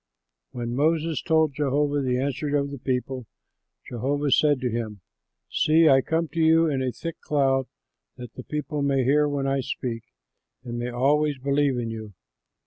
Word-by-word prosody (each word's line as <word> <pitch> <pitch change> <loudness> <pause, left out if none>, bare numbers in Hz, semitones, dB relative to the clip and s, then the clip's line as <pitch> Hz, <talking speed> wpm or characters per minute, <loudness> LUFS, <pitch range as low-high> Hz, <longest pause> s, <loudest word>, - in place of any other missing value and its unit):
When 120 -1 -5
Moses 160 +1 +1
told 160 -2 +2
Jehovah 145 +1 0
the 125 -2 0
answer 140 +2 -1
of 140 0 -2
the 140 - -7
people, 125 -1 -3 0.6
Jehovah 140 +4 -1
said 145 0 +4
to 125 -2 -1
him, 110 -4 -4 0.5
"See, 160 +1 +4
I 135 -2 +6
come 160 +4 -1
to 165 - -5
you 160 +1 +5
in 140 -4 -1
a 130 -1 -1
thick 165 +5 -7
cloud, 135 -3 +1 0.5
that 125 -2 -9
the - - -8
people 150 +1 -3
may 140 -2 +2
hear 145 +3 +3
when 140 -1 -2
I 135 0 +1
speak 120 -2 -4 0.6
and 120 -2 -5
may 120 +1 -3
always 145 +4 +1
believe 140 0 +1
in 115 -2 -3
you." 110 -2 -7
140 Hz, 170 wpm, -25 LUFS, 125-150 Hz, 0.6 s, I